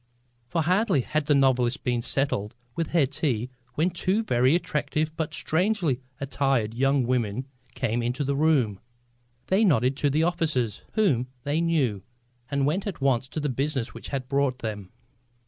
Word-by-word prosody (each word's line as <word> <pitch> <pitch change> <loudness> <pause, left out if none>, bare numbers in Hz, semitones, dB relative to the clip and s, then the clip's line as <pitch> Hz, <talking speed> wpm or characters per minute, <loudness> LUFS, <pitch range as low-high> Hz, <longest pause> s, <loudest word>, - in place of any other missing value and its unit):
For 165 +6 0
hardly 180 - +2
had 155 +3 -2
the 145 - +4
novelist 130 -1 +2
been 120 -2 0
settled 115 -5 -1 0.2
with 165 -2 -1
her 165 -5 +3
tea 130 -3 -1 0.2
when 170 +4 +2
two 190 +5 0
very 130 - +3
attractive 155 -2 -1
but 160 -1 -2
strangely 165 - +1 0.2
attired 135 -5 0
young 135 +2 +2
women 120 -1 0 0.3
came 120 -2 0
into 125 +4 -1
the 140 0 0
room. 135 -10 +2 0.7
They 190 - +3
nodded 135 - +3
to 145 - +2
the 155 +3 +2
officers, 155 - 0
whom 140 - +2 0.2
they 145 +3 0
knew, 140 - +1 0.5
and 140 -1 +1
went 180 +8 0
at 195 - -4
once 135 -2 +1
to 155 - -5
the 150 - -1
business 135 -2 -2
which - - -8
had 135 -2 -3
brought 140 -2 +1
them. 105 -5 -5
140 Hz, 165 wpm, -26 LUFS, 125-160 Hz, 0.7 s, the